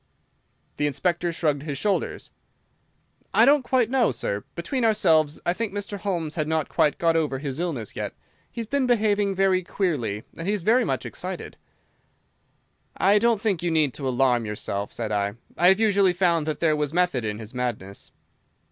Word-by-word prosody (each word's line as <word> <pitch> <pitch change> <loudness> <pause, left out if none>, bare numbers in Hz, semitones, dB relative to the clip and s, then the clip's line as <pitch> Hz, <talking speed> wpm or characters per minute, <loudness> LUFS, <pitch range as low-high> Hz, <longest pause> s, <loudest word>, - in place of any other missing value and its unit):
The 145 - +1
Inspector 170 +5 -1
shrugged 150 -4 0
his 145 -2 -4
shoulders. 200 +7 -2 1.0
"I - - +7
don't 285 +1 +5
quite 250 -2 +1
know, 250 -1 +2
sir. 105 -4 -3
Between 235 +9 -2
ourselves, 165 -9 +3
I 175 - +2
think 225 +2 -3
Mr. 205 0 -5
Holmes 170 -7 -2
had 155 -3 -2
not 160 -1 -1
quite 150 - +2
got 165 -1 +2
over 150 -4 0
his 135 +1 -5
illness 145 - -3
yet. - - -4 0.3
He's 230 - -5
been 270 +3 0
behaving 205 -4 +2
very 190 -1 +3
queerly, 140 - -2
and 165 - -6
he 205 - +2
is 195 - -5
very 235 +6 +4
much - - -2
excited." - - -6 1.4
"I 205 +2 +4
don't 230 -1 +2
think 200 -5 0
you 175 - 0
need 155 -5 +1
alarm 130 -3 +1
yourself," 105 -1 -4
said 110 -2 -4
I. 100 0 -1 0.2
"I 175 - +4
have 190 +2 +5
usually 200 -4 +3
found 170 -3 +1
that 155 - -3
there 160 -2 +3
was 150 0 -2
method 175 -9 +1
in 105 -1 -3
his 110 +1 -9
madness." 120 -6 -5
170 Hz, 175 wpm, -25 LUFS, 135-200 Hz, 1.4 s, I